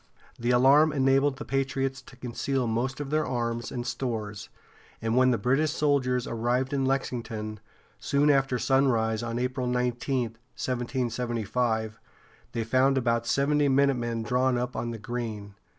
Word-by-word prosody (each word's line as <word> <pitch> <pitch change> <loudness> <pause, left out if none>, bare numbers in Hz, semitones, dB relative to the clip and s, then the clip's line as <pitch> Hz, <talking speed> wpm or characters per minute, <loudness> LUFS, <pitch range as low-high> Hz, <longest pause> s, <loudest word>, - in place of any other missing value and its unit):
The 120 +1 -1
alarm 135 +5 +5
enabled 135 0 +2
the 150 - -7
patriots 135 0 -1
to 125 - -15
conceal 125 +1 -2
most 120 +4 -1
of 145 -1 -5
their 155 0 +2
arms 120 -3 -2
and 120 -1 -4
stores, 110 -5 -4 0.5
and 115 +1 -1
when 130 0 +5
the 120 - +2
British 135 +7 +2
soldiers 140 -5 +1
arrived 120 +4 -1
in 135 -1 +1
Lexington, 115 -5 -3 0.4
soon 145 +1 +3
after 135 -2 +2
sunrise 120 -5 +2
on 120 0 -3
April 125 +1 -1
19, 125 +1 0 0.4
1775, 120 -3 -1 0.5
they 115 - -1
found 130 +4 +3
about 115 -2 +1
seventy 145 +1 +2
minutemen 125 -4 +1
drawn 125 +2 +1
up 125 +1 -3
on 120 - -2
the 115 - -5
green. 110 -3 -5
125 Hz, 145 wpm, -27 LUFS, 115-135 Hz, 0.5 s, alarm